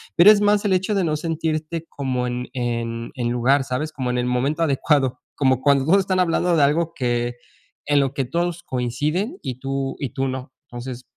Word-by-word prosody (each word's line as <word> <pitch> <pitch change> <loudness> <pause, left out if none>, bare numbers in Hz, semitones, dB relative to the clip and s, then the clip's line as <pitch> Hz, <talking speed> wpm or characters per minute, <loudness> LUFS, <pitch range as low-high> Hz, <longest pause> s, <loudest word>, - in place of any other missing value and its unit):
pero 190 +5 +9
es 205 - +4
más 205 0 +3
el 200 - +3
hecho 190 +3 +1
de 195 - +2
no 155 -3 0
sentirte 160 0 -2
como 130 -3 -2
en 125 0 -3
en 115 -2 -3
en 120 -4 -2
lugar, 130 +3 +3
¿sabes?, 140 +4 -2
como 130 -3 -3
en 125 - 0
el 125 - 0
momento 135 +6 0
adecuado, 140 -3 +1 0.2
como 130 -2 +2
cuando 140 -1 +3
todos 190 +6 +5
están 190 -1 0
hablando 175 0 +2
de 150 - +4
algo 165 +4 +2
que 120 -3 -1 0.5
en 145 -1 +3
lo 135 -1 +1
que 135 - 0
todos 170 +5 -2
coinciden, 150 - -2
y 130 -1 -5
tú 135 0 -3
y 135 - -2
tú 135 +4 -2
no. 130 0 -5 0.2
Entonces, 120 +1 -7
140 Hz, 205 wpm, -22 LUFS, 125-165 Hz, 0.5 s, pero